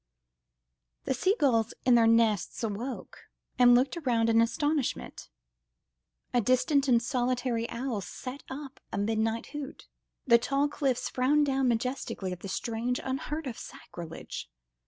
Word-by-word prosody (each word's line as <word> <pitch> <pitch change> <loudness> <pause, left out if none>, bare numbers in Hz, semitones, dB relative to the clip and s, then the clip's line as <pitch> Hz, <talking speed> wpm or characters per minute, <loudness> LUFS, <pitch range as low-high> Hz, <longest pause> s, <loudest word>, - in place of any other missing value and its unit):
The - - 0
sea 380 +9 +2
gulls 230 -6 +2
in 250 - +5
their 230 -1 +6
nests 225 -2 +2
awoke 225 +4 -5 0.3
and 245 -1 +8
looked 265 +7 +2
round 230 -3 +2
in 225 0 +5
astonishment; 290 +4 -1 1.0
a 245 - +4
distant 270 +5 +2
and 240 -3 +5
solitary 245 -1 -1
owl 235 -3 -3
set 260 +7 -7
up 275 0 -8
a - - -3
midnight 220 +2 0
hoot, 295 -1 -7 0.4
the 235 -2 +6
tall 275 +4 +1
cliffs 270 -4 -1
frowned 290 +4 +2
down 270 -1 +1
majestically 235 -5 -2
at 180 - -5
the 195 - -7
strange, 235 +5 -2
unheard 290 +4 -3
of 245 -4 -5
sacrilege. 165 -2 -8
245 Hz, 135 wpm, -29 LUFS, 230-270 Hz, 1.0 s, and